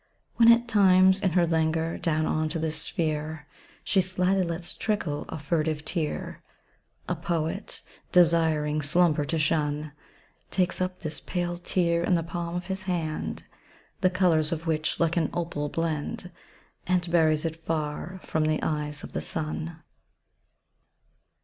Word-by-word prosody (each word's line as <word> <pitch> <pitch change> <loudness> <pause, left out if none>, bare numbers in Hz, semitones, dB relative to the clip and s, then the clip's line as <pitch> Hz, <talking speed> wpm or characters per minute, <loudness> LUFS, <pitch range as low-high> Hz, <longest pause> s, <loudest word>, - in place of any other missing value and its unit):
When 230 0 +8
at 235 +1 +4
times, 190 -3 +5
in 190 -5 +1
her 175 -1 +4
languor, 160 0 0
down 155 -1 +1
on 155 0 0
to 165 - -3
this 160 -1 0
sphere, 155 -2 -2 0.4
She 195 - +3
slyly 185 +1 +1
lets 170 0 -4
trickle 175 -9 -2
a - - -4
furtive 155 0 -1
tear, 160 -5 -3 0.7
A - - 0
poet, 170 +4 -3 0.3
desiring 160 -3 +3
slumber 150 0 +3
to 165 - -1
shun, 150 -1 0 0.6
Takes 185 0 0
up 185 0 -2
this 155 -2 -3
pale 175 -1 -2
tear 170 -1 0
in 180 - +3
the 165 - 0
palm 170 +1 -4
of 175 - -3
his 190 0 -3
hand 160 -4 -2 0.6
(The 185 - +4
colours 170 -4 +2
of 165 0 -3
which 155 -1 0
like 170 +1 +1
an 160 -3 +2
opal 165 -4 -2
blend), 165 +2 -3 0.6
And 180 -1 +1
buries 155 -2 +3
it 165 0 -4
far 160 +3 -3
from 155 -1 0
the 155 0 0
eyes 150 -1 -2
of - - -9
the - - -2
sun. 160 +1 -3
165 Hz, 150 wpm, -27 LUFS, 155-180 Hz, 0.7 s, When